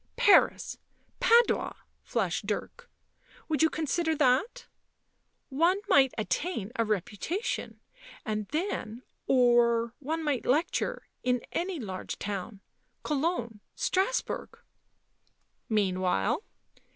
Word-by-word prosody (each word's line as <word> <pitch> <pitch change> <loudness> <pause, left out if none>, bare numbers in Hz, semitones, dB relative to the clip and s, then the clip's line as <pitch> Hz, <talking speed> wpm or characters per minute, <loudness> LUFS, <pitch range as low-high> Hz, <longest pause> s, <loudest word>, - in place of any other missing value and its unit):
" - - -43
Paris! 410 - +4 0.4
Padua 470 +1 +4 0.2
!" - - -44
flashed - - -2
Dirk. 485 0 -4 0.3
" - - -27
Would 310 -1 0
you 320 - +5
con 315 0 -3
sider 320 +2 0
that? 300 - +2 0.8
One 335 +8 +2
might 270 -2 +6
attain 215 - -2
a 230 - +2
reputation, 215 - -3 0.5
and 215 -3 -2
then 285 - -3
— - - -49
or 240 -2 +4
one 320 +3 -3
might 290 -5 -1
lecture 335 - 0
— - - -50
in 250 -1 0
any 355 -1 -2
large 190 -6 -5
town 200 0 -5 0.2
— - - -46
Cologne, 275 -7 -1 0.2
Strasbourg." 390 +7 -1 0.6
" - - -43 0.3
Meanwhile 185 - +1
265 Hz, 120 wpm, -29 LUFS, 220-340 Hz, 0.8 s, might